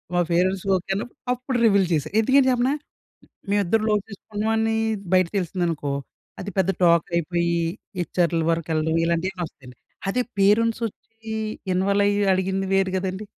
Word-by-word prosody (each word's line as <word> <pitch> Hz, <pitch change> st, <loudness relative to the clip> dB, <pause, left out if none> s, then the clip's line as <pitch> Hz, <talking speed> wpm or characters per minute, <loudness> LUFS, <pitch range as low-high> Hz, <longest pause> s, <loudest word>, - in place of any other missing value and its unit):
మా 175 Hz, -, +4 dB
పేరెంట్స్‌కి 185 Hz, +3 st, +1 dB
ఓకేన్నప్పుడు 195 Hz, +8 st, -4 dB
అప్పుడు 250 Hz, 0 st, -3 dB
రివీల్ 200 Hz, -4 st, +4 dB
చేశా. 150 Hz, -3 st, 0 dB
ఎందుకంటే 265 Hz, +4 st, +4 dB
చెప్పనా! 250 Hz, +3 st, +2 dB, 0.8 s
మేవిద్దరం 205 Hz, +2 st, +2 dB
లవ్ 210 Hz, -1 st, +2 dB
చేసుకుంటున్నాం 210 Hz, +1 st, -4 dB
అని 225 Hz, 0 st, +1 dB, 0.4 s
బయట 185 Hz, -1 st, +4 dB
తెలిసిందనుకో 170 Hz, -5 st, -1 dB, 0.5 s
అది 200 Hz, -, -5 dB
పెద్ద 190 Hz, 0 st, +2 dB
టాకయిపోయి 170 Hz, 0 st, +2 dB, 0.4 s
హెచ్‌ఆర్‌ల 170 Hz, -1 st, 0 dB
వరకెళ్ళడం 160 Hz, -1 st, 0 dB
ఇలాంటియన్నీ 175 Hz, +3 st, -1 dB
వస్తాయండి. 125 Hz, -4 st, -16 dB, 0.3 s
అదే 250 Hz, +6 st, +1 dB, 0.2 s
పేరెంట్స్ 225 Hz, +4 st, +3 dB
వచ్చి 225 Hz, +1 st, -11 dB, 0.4 s
ఇన్వాల్వ్ 200 Hz, +2 st, +2 dB
అయ్యి 205 Hz, 0 st, +1 dB
అడిగింది 190 Hz, +1 st, -1 dB
వేరు 195 Hz, -1 st, +2 dB
గదండీ! 190 Hz, +2 st, -3 dB
190 Hz, 130 wpm, -23 LUFS, 170-215 Hz, 0.8 s, మా